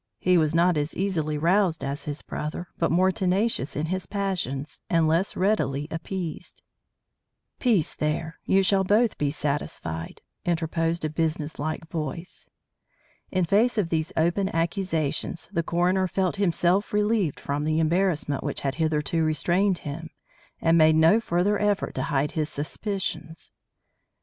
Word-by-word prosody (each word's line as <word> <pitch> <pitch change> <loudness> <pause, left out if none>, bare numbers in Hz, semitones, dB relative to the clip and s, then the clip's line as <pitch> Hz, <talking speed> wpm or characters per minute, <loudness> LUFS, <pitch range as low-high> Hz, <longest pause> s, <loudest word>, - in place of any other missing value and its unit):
He 180 +9 +2
was 160 -2 +2
not 175 0 +4
as 145 +1 -2
easily 160 -6 -1
roused 170 +1 +2
as 140 +1 -4
his 145 0 -5
brother, 155 +4 -5
but - - +2
more 185 +3 +3
tenacious 190 - 0
in 150 +3 -1
his 185 0 -3
passions, 180 -9 -3
and 165 -2 +3
less 165 +5 +1
readily 150 -8 +1
appeased. 165 0 -5 1.0
"Peace, 215 - +2
there! 155 +1 -2
You 195 0 +3
shall 195 0 +3
both 210 +4 +2
be 145 - +1
satisfied," 140 - -3 0.2
interposed 165 -1 0
a - - 0
businesslike 155 0 -2
voice. 165 +2 -5 0.8
In 185 -2 +1
face 220 +7 +3
of 195 -6 +1
these 160 -1 -1
open 175 +4 +2
accusations, 165 -2 -1
the 170 - +1
coroner 180 +3 +1
felt 185 +2 -1
himself 185 +1 +1
relieved 210 -5 +1
from 145 +1 -2
the 155 +1 +1
embarrassment 165 -3 +1
which - - -3
had 135 -1 -1
hitherto 160 +1 +1
restrained 175 +5 +2
him, 160 +3 -5 0.5
and 165 0 +4
made 155 0 +6
no 160 +7 +5
further 200 0 +1
effort 205 -1 0
to 130 - -2
hide 140 +1 +1
his 155 -1 -1
suspicions. 160 +2 -4
165 Hz, 145 wpm, -26 LUFS, 155-190 Hz, 1.0 s, made